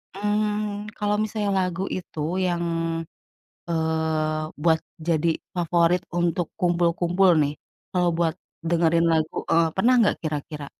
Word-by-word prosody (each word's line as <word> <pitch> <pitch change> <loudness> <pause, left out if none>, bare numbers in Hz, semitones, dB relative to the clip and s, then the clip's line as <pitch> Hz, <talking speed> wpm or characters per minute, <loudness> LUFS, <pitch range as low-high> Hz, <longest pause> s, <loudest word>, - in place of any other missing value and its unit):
mmm, 210 0 -1
kalo 210 0 +1
misalnya 210 -1 -1
lagu 185 0 0
itu, 180 -4 -6 0.3
yang, 175 -1 -1 1.1
eee, 160 -1 0
buat 160 -1 +3 0.2
jadi 165 0 +1 0.2
favorit 175 +1 +2
untuk 175 -1 0
kumpul-kumpul 175 +1 +2
nih, 145 +1 -1 0.4
kalo 180 -1 +2
buat 165 -1 0 0.4
dengerin 170 0 +3
lagu, 160 -1 0
eee, 165 0 +4
pernah 245 +6 +4
nggak 210 - +3
kira-kira? 150 -1 -4
170 Hz, 115 wpm, -24 LUFS, 160-190 Hz, 1.1 s, eee